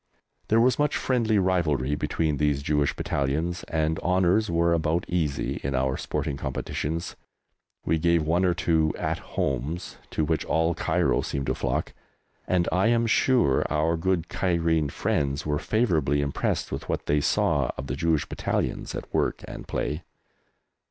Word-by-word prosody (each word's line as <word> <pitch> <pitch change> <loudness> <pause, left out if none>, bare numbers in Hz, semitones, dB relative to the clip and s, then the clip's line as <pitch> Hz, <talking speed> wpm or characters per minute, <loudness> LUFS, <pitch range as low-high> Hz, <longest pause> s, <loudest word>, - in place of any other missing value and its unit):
There 110 - +4
was 125 +4 +3
much 150 0 +2
friendly 115 -4 +1
rivalry 80 -8 +1
between 75 0 0
these 75 -1 +1
Jewish 75 -1 +1
Battalions, 80 +6 -1
and 80 0 0
honours 95 +4 +2
were 85 0 +2
about 85 +1 0
easy 80 -6 -1
in 70 0 -2
our 65 +1 +1
sporting 70 - -3
competitions. 80 +5 -3 0.7
We 80 - +1
gave 85 0 +3
one 85 +4 +1
or 90 -2 +2
two 80 -2 +1
"At - - -2
Homes," 70 +6 -3
to 80 - 0
which 80 +1 0
all 80 +1 +1
Cairo - - +1
seemed 70 -1 -3
to - - 0
flock, - - -2 0.5
and 90 -2 +2
I 90 +5 +3
am 115 0 +3
sure 115 - +3
our 80 +2 +1
good 85 0 0
Cairene 85 -5 +1
friends 70 +2 -1
were 75 -1 0
favourably 80 - +1
impressed 70 -1 -1
with - - -5
what - - -2
they 75 0 +2
saw - - +1
of 70 - -5
the 65 - -3
Jewish 80 0 +1
Battalions - - -2
at - - -7
work - - 0
and - - -8
play. 75 +4 -2
80 Hz, 160 wpm, -26 LUFS, 75-90 Hz, 0.7 s, There